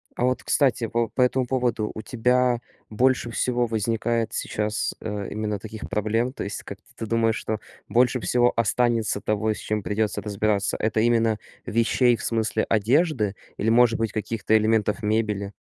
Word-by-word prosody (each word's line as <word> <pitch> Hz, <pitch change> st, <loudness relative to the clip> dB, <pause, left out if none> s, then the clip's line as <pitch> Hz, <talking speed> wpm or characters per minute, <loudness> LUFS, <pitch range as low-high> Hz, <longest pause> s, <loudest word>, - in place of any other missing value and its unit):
А 120 Hz, -, 0 dB
вот, 130 Hz, 0 st, 0 dB
кстати, 125 Hz, -5 st, +2 dB
во 115 Hz, 0 st, +1 dB
по 130 Hz, -, -2 dB
этому 125 Hz, 0 st, +2 dB
поводу. 120 Hz, -4 st, 0 dB
У 110 Hz, -, -5 dB
тебя 125 Hz, +1 st, +2 dB, 0.3 s
больше 120 Hz, +2 st, +1 dB
всего 120 Hz, +1 st, +1 dB
возникает 115 Hz, 0 st, -1 dB
сейчас, 105 Hz, 0 st, -1 dB
э, 105 Hz, -2 st, -4 dB
именно 105 Hz, -1 st, -2 dB
таких 110 Hz, +1 st, -8 dB
проблем? 115 Hz, +4 st, 0 dB
То -, -, -5 dB
есть, 100 Hz, -, -4 dB
как 100 Hz, -, -8 dB, 0.2 s
ты 115 Hz, -, -4 dB
думаешь, 115 Hz, 0 st, +2 dB
что 110 Hz, 0 st, -3 dB, 0.3 s
больше 125 Hz, +1 st, +3 dB
всего 120 Hz, +1 st, +2 dB
останется 115 Hz, -2 st, +1 dB
того, 110 Hz, +1 st, 0 dB
с -, -, -9 dB
чем 105 Hz, 0 st, -2 dB
придется 105 Hz, 0 st, -1 dB
разбираться? 105 Hz, 0 st, 0 dB
Это 110 Hz, 0 st, 0 dB
именно 115 Hz, -2 st, +2 dB, 0.3 s
вещей, 115 Hz, +2 st, +2 dB
в -, -, -9 dB
смысле 110 Hz, -1 st, 0 dB
одежды 115 Hz, -, +2 dB, 0.2 s
или, 110 Hz, -, 0 dB
может 115 Hz, 0 st, +4 dB
быть, 115 Hz, -2 st, -1 dB
каких-то 110 Hz, 0 st, -1 dB
элементов 110 Hz, 0 st, +2 dB
мебели? 105 Hz, -2 st, -1 dB
115 Hz, 165 wpm, -24 LUFS, 105-120 Hz, 0.3 s, может